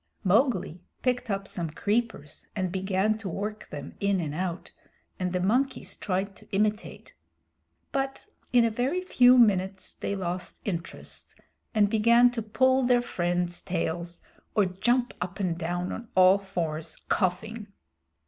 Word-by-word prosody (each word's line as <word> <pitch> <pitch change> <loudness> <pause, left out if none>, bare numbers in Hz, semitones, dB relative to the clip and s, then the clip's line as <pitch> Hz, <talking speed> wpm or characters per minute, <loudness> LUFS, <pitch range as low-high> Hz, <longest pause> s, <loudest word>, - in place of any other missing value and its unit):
Mowgli 195 - +2 0.2
picked 250 -2 0
up 195 -1 -2
some 170 -4 -2
creepers 205 -3 -2
and 185 -3 -1
began 190 +3 0
to 205 -4 -5
work 210 +4 -5
them - - -7
in 200 -1 +1
and 155 -4 -3
out, 180 +1 -3 0.5
and 180 -1 -1
the 180 - 0
monkeys 245 +9 0
tried 195 0 -2
to - - -18
imitate; 210 +2 -1 0.8
but 270 -1 -2 0.3
in 240 -2 +5
a 230 - +1
very 265 +11 0
few 250 -8 +6
minutes 195 -4 +2
they 200 - -3
lost 180 -2 -4
interest 175 -4 -6 0.4
and 210 -1 +5
began 235 +3 +5
to 240 -2 -3
pull 260 +5 +3
their 245 -1 +3
friends' 175 -3 -1
tails 170 -1 -3 0.3
or 210 - +4
jump 240 +7 +1
up 180 +3 -4
and 175 -3 -1
down 175 +2 -2
on 235 - -6
all 185 +1 +7
fours, 165 -5 -4
coughing. 210 +4 -1
195 Hz, 145 wpm, -27 LUFS, 180-230 Hz, 0.8 s, all